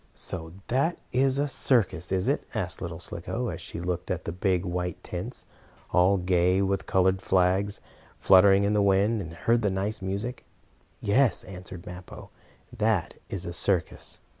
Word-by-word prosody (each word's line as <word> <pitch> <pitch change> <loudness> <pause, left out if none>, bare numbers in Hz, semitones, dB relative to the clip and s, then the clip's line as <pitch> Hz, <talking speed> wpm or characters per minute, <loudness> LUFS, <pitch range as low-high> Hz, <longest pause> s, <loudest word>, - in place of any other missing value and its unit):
"So 80 -2 -5
that 140 +8 +1
is 135 +1 +2
a 145 +1 +1
circus, 110 - +1
is 95 -1 +1
it?" - - +1
asked - - -2
little - - -4
Slicko, - - -4
as - - -5
she - - -6
looked 90 0 -3
at 90 -1 -2
the - - -2
big, 95 +1 0
white 90 0 -3
tents, - - -5 0.5
all 90 +3 +4
gay 90 0 +2
with 95 0 -1
colored 95 0 +2
flags, 95 +2 +2 0.4
fluttering 95 +1 +6
in 100 +1 +2
the 105 - +3
wind, 100 +3 +3
and 85 -3 -7
heard 115 +8 +1
the 105 - +2
nice 100 +3 -2
music. 100 +6 -4 0.6
"Yes," 125 +5 +2
answered 90 -1 -9
Mappo, 90 0 -10 0.4
"that 110 -6 +1 0.2
is 95 -1 -4
a 85 - -4
circus." 90 -1 0
95 Hz, 165 wpm, -27 LUFS, 90-105 Hz, 0.6 s, fluttering